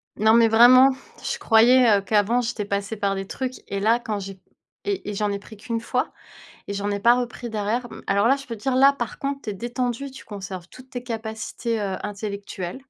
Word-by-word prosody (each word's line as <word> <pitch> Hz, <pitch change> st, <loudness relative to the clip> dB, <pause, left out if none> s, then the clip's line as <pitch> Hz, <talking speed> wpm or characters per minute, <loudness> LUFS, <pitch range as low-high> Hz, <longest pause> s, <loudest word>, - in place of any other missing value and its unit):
Non, 220 Hz, +1 st, +4 dB
mais 230 Hz, -1 st, +6 dB
vraiment, 250 Hz, +4 st, +7 dB, 0.3 s
je -, -, -2 dB
croyais, 230 Hz, -1 st, +5 dB
heu, -, -, -6 dB
qu'avant, 210 Hz, +4 st, +2 dB
j'étais 225 Hz, -3 st, -3 dB
passée 200 Hz, +2 st, -2 dB
par 200 Hz, -1 st, 0 dB
des 195 Hz, 0 st, -5 dB
trucs 255 Hz, -1 st, -5 dB
et 200 Hz, -, -3 dB
là, 225 Hz, +4 st, +3 dB
quand 215 Hz, -3 st, -3 dB
j'ai 195 Hz, -1 st, -8 dB, 0.5 s
et 395 Hz, -, -2 dB
et -, -, -3 dB
j'en 205 Hz, 0 st, -1 dB
ai 200 Hz, -, -2 dB
pris 215 Hz, +1 st, -13 dB
qu'1 230 Hz, +2 st, -4 dB
fois -, -, -2 dB, 0.5 s
et 200 Hz, -, -3 dB
j'en 200 Hz, +1 st, -2 dB
ai 200 Hz, -, -2 dB
pas 235 Hz, +4 st, +5 dB
repris 240 Hz, 0 st, -5 dB
derrière. 220 Hz, +3 st, -2 dB
M -, -, -11 dB
alors 200 Hz, +3 st, +2 dB
là, 270 Hz, -, +5 dB
je 275 Hz, 0 st, -9 dB
peux 230 Hz, -, -6 dB
dire 260 Hz, +4 st, -1 dB
là, 275 Hz, +2 st, +7 dB
par 240 Hz, -5 st, -5 dB
contre, 275 Hz, 0 st, -3 dB
tu 215 Hz, -, -4 dB
es -, -, -5 dB
détendu, 245 Hz, +5 st, -3 dB
tu 265 Hz, -, -12 dB
conserves 190 Hz, -4 st, -7 dB
toutes 255 Hz, 0 st, -15 dB
tes 245 Hz, -1 st, -5 dB
capacités, 225 Hz, 0 st, -4 dB
heu, 195 Hz, -2 st, -2 dB
intellectuelles. 200 Hz, -1 st, -5 dB
225 Hz, 225 wpm, -23 LUFS, 200-245 Hz, 0.5 s, vraiment